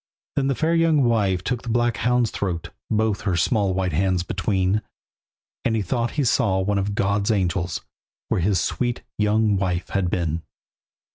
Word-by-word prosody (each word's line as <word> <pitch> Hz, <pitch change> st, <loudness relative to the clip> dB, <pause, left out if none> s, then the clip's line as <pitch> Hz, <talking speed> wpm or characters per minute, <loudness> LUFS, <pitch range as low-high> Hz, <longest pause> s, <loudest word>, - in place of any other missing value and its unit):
Then 135 Hz, -1 st, +1 dB
the 135 Hz, -, +1 dB
fair 160 Hz, +5 st, +1 dB
young 165 Hz, -4 st, +4 dB
wife 100 Hz, -7 st, +2 dB
took 125 Hz, +2 st, -2 dB
the 120 Hz, -, -7 dB
black 120 Hz, 0 st, +1 dB
hound's 125 Hz, -2 st, +2 dB
throat 90 Hz, -5 st, -3 dB, 0.2 s
Both 110 Hz, -1 st, +1 dB
her 95 Hz, -5 st, 0 dB
small 100 Hz, +1 st, +1 dB
white 95 Hz, -2 st, 0 dB
hands 90 Hz, +2 st, +1 dB
between. 95 Hz, +2 st, 0 dB, 0.8 s
And 115 Hz, -, +1 dB
he 110 Hz, -, 0 dB
thought 115 Hz, +5 st, -1 dB
he 145 Hz, -, +3 dB
saw 105 Hz, -5 st, +2 dB
one 100 Hz, +1 st, +1 dB
of 100 Hz, +1 st, -2 dB
God's 100 Hz, +1 st, +1 dB
angels 90 Hz, -4 st, 0 dB, 0.5 s
Where -, -, 0 dB
his 95 Hz, 0 st, +2 dB
sweet 120 Hz, +7 st, -1 dB, 0.2 s
young 105 Hz, 0 st, +3 dB
wife 90 Hz, -2 st, -1 dB
had 95 Hz, -3 st, 0 dB
been. 85 Hz, -2 st, -1 dB
100 Hz, 170 wpm, -23 LUFS, 95-115 Hz, 0.8 s, young